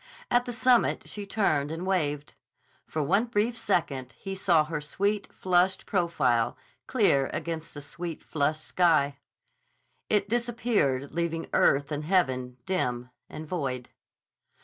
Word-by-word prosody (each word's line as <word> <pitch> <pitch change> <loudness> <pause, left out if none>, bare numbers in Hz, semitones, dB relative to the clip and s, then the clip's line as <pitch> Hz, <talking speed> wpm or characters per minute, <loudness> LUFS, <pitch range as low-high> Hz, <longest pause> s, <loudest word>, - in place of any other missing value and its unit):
At 245 0 +3
the 245 - -4
summit 250 0 +2
she 205 -1 -6
turned 155 -9 +1
and 165 +3 -4
waved. 150 -6 -1 0.5
For 155 - -2
one 195 +10 +2
brief 230 0 0
second 145 - -1
he 195 +11 -7
saw 175 -5 +3
her 155 -1 -4
sweet, 200 +7 -1
flushed 185 +1 +1
profile 135 - +1 0.3
clear 195 - +3
against 165 -2 -4
the 145 - -7
sweet, 170 +2 -6
flushed 155 +1 -1
sky. 150 -6 +2 0.9
It 205 -2 +2
disappeared 225 - 0
leaving 165 0 -2
earth 140 +2 +3
and 150 0 -2
heaven 130 -8 +1
dim 125 -9 -1 0.2
and 155 +1 -7
void. 135 -8 -3
165 Hz, 130 wpm, -28 LUFS, 140-195 Hz, 0.9 s, At